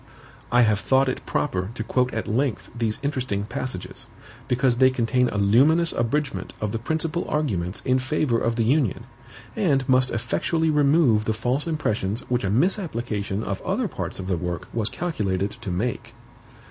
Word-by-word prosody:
I 120 0 +5
have 110 -3 +2
thought 135 +4 +3
it 130 - -3
proper 95 -9 -1
to 110 - -3
quote 125 +2 +1
at 110 - -3
length 125 +2 -1
these 115 -2 -1
interesting 130 -8 -1
passages, 125 -4 -5 0.4
because 125 -1 +2
they 130 +1 +6
contain 125 0 +1
a - - -3
luminous 140 +12 +4
abridgment 120 -4 -2
of 105 -1 -2
the 115 - -2
principal 160 +6 -2
arguments 100 - -1
in 130 0 +2
favor 130 -2 0
of 115 0 0
the 115 - +1
Union, 125 -2 +1 0.5
and 145 - +1
must 130 0 +4
effectually 155 +8 0
remove 140 -7 +4
the 110 - +1
false 125 +7 +1
impressions 110 -9 -1
which 125 -1 +1
a 95 - 0
misapplication 115 - 0
of 95 -3 -3
other - - -1
parts - - -5
of 95 - -5
the 90 -2 0
work 90 -1 -4
was 115 -2 -1
calculated 100 - -2
to 100 - -8
make. 115 +5 -3
120 Hz, 170 wpm, -24 LUFS, 105-140 Hz, 0.5 s, they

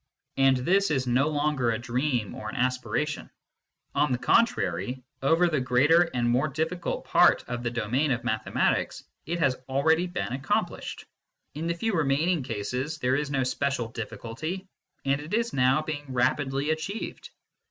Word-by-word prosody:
And 135 -1 +5
this 190 +9 +2
is 135 -4 0
no 125 +4 +2
longer 145 -4 +1
a 115 - +1
dream 125 -1 -1
or 110 - -6
an - - -7
aspiration. 130 +4 -1 0.6
On 150 -2 +2
the 125 - +2
contrary, 130 - +1 0.2
over 165 +6 +4
the 155 -4 +1
greater 150 +8 +4
and 120 -1 +1
more 125 +5 +2
difficult 160 +4 -3
part - - +5
of 120 -1 -3
the 120 - -1
domain 120 +6 0
of 125 -3 0
mathematics, - - 0 0.2
it 170 +2 -1
has 140 -6 +3
been 130 0 -17
already 160 +6 +2
accomplished; 135 -2 -2 0.5
in 155 +3 -4
the 170 - 0
few 225 +5 -1
remaining 160 +1 +2
cases, 125 +6 -3
there 130 -3 +1
is 145 0 -1
no 135 -2 +1
special 130 -2 -1
difficulty, 120 - -5 0.4
and 140 +1 +1
it 155 +8 -3
is 235 +1 0
now 135 +3 +3
being 145 -3 -5
rapidly 135 +3 +1
achieved. 160 +8 -4
140 Hz, 160 wpm, -27 LUFS, 125-155 Hz, 0.6 s, And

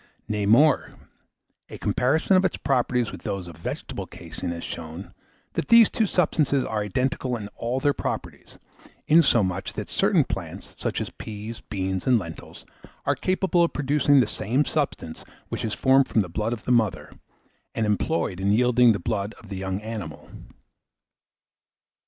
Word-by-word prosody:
Nay 105 -2 -1
more 140 +8 +4 0.7
a - - -8
comparison 155 +9 +2
of 185 - +4
its 190 - 0
properties 125 -3 0
with - - -9
those 100 -4 -4
of 85 - -10
vegetable 80 - -5
caseine - - -7
has 85 0 -5
shown 80 +4 -7 0.4
that - - -2
these 230 -2 +7
two 220 - +1
substances 150 -6 +1
are 110 -1 -2
identical 125 - -1
in 105 -2 -7
all 120 +4 -3
their 145 +1 +2
properties; - - -5 0.5
insomuch, 120 - +3
that - - -5
certain - - +3
plants, - - -6
such - - -2
as - - -5
peas, 110 +2 -8
beans, 95 0 -2
and 125 -2 +5
lentils, 85 -6 -8 0.4
are - - +3
capable 185 -1 +1
of 170 - 0
producing 145 -1 +3
the - - +2
same 125 +7 0
substance 140 - -3 0.3
which - - -4
is 110 -2 -2
formed 135 0 +4
from 110 - +2
the 90 - -4
blood 105 +6 -2
of 120 -2 -5
the - - 0
mother, 115 -5 +1 0.6
and 110 - 0
employed 105 - 0
in 100 +1 +1
yielding 125 +1 +5
the 100 - -3
blood 105 +2 -3
of 110 - -16
the 100 - -5
young 95 0 -3
animal. 105 -8 -7
115 Hz, 165 wpm, -25 LUFS, 100-140 Hz, 0.7 s, these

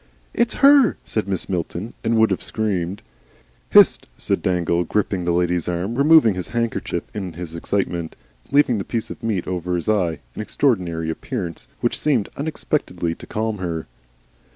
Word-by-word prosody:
"It's 235 0 +1
her!" 280 -5 +6
said 110 -2 -2
Mrs. 95 -2 -2
Milton, 90 +4 -3
and 115 0 +2
would 110 0 +4
have - - -1
screamed. 100 -3 -1 0.7
"Hist!" - - +6
said - - -1
Dangle, 90 -1 +1
gripping 95 0 -1
the 85 - +1
lady's 90 0 +1
arm, 90 +5 -2
removing 140 -3 +6
his 90 -1 -5
handkerchief 115 -1 -2
in 95 -5 -5
his 85 0 -7
excitement, 85 -1 -2 0.3
and - - -26
leaving 125 -6 +4
the - - -2
piece 115 +2 -3
of - - -9
meat 105 -6 -1
over 90 -1 -2
his 85 - -3
eye, 90 -7 +1 0.2
an - - -5
extraordinary 90 - 0
appearance 90 - -5
which - - 0
seemed 130 -9 +1
unexpectedly 140 - -2
to - - -12
calm 110 -1 -2
her. 85 -3 -3
95 Hz, 165 wpm, -22 LUFS, 85-115 Hz, 0.7 s, her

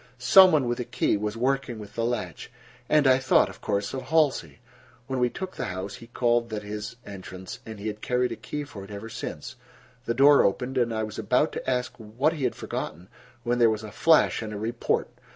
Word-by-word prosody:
Some 185 +10 +7
one 145 -6 +2
with 120 0 -1
a - - -1
key - - 0
was 105 +2 -3
working 135 0 0
with 105 -1 -10
the 115 - -2
latch, 115 -8 -3 0.4
and 150 -1 +4
I 130 0 +5
thought, 130 - +3
of - - -13
course, 100 -1 -1
of 130 - -3
Halsey. 140 - +1 0.5
When 130 0 -3
we 125 0 +3
took 190 +8 -6
the - - -3
house 95 +2 -5
he 115 - -13
called 120 -1 +1
that 105 -2 -4
his 105 +2 -6
entrance, 95 -2 -8
and 110 -2 -8
he 100 - -8
had 105 -1 -4
carried 125 0 0
a - - -3
key 150 0 -5
for 110 -9 -9
it 100 - -12
ever 105 +2 -7
since. 110 - -7 0.5
The 115 - -1
door 140 +2 +7
opened 125 +6 0
and 120 -2 +1
I 110 -1 -1
was 110 -1 -6
about 125 +8 +2
to - - -4
ask 125 -1 -1
what 120 +9 0
he 145 -5 -2
had 125 - -1
forgotten, 85 +4 -6 0.3
when 120 +1 0
there 115 -1 +6
was 110 0 -2
a 110 - -8
flash 160 +6 +3
and 110 -1 -5
a 105 - -5
report. 115 +3 -1
115 Hz, 225 wpm, -26 LUFS, 105-130 Hz, 0.5 s, Some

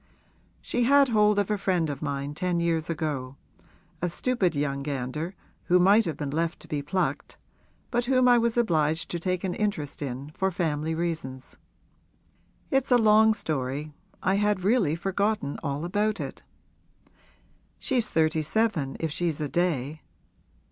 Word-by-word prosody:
She 245 - -2
had 280 +1 +5
hold 210 -2 +4
of 205 0 +1
a 210 - 0
friend 180 -4 +1
of 145 -2 -5
mine 140 -1 -3
ten 180 +2 -1
years 165 -1 0
ago 145 -5 -3 0.7
a 175 - 0
stupid 190 -3 0
young 140 -1 -1
gander 145 +5 -4 0.3
who 180 - +4
might 200 +5 +5
have 160 -4 -3
been 145 -2 -3
left 165 +2 -1
to - - -12
be 145 -1 -2
plucked 185 +6 -2 0.5
but 240 0 +1
whom 255 0 +3
I 245 -1 +6
was 235 0 0
obliged 160 -7 +1
to 175 - -2
take 185 +1 -2
an 185 -2 -1
interest 175 -11 -2
in 135 +1 -5
for 190 +5 0
family 160 -3 -1
reasons. 160 -6 -4 1.2
It's 270 -1 +1
a 250 - +6
long 220 -1 +5
story 150 -3 -3 0.3
I 190 +1 +2
had 205 -2 +1
really 200 -7 +2
forgotten 195 -3 -1
all 145 +2 -3
about 210 +4 0
it. - - -6 1.4
She's 245 -4 0
thirty 160 0 +2
seven 155 -5 0
if 160 -2 -2
she's 165 -1 -1
a 150 - -1
day. 155 -4 -1
170 Hz, 155 wpm, -27 LUFS, 150-210 Hz, 1.4 s, I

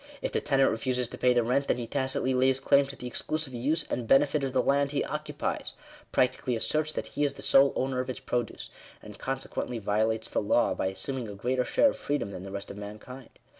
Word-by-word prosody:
If - - -1
the - - 0
tenant 135 -1 +3
refuses 125 +2 -1
to - - -8
pay 125 - +4
the 120 - +4
rent, 130 +4 +1
then - - +2
he 120 - -3
tacitly 130 +1 -1
lays 130 +1 +3
claim 140 +1 +4
to 140 - -8
the - - -9
exclusive 150 +3 -3
use 135 +7 0
and 120 -2 -3
benefit 145 +2 +4
of 135 - -1
the 130 -1 +2
land 140 0 +2
he 140 0 0
occupies - - -3 0.2
— - - -22
practically 125 0 +1
asserts 155 +7 0
that - - -3
he 145 - 0
is 140 -1 0
the - - -9
sole 135 0 +6
owner 130 -1 -1
of 130 0 -2
its 130 - -4
produce; 120 -3 -3 0.3
and 105 -1 -11
conse 135 0 -3
quently 120 - -3
violates 110 +2 0
the - - +1
law, - - +2
by - - -1
assuming 120 +6 -3
a 100 - -7
greater 125 +5 0
share 285 - +4
of - - -9
freedom 140 -9 -2
than 90 - -7
the 95 +1 -8
rest 100 0 -5
of 100 - -9
mankind. 105 +5 -9
130 Hz, 240 wpm, -28 LUFS, 115-140 Hz, 0.3 s, sole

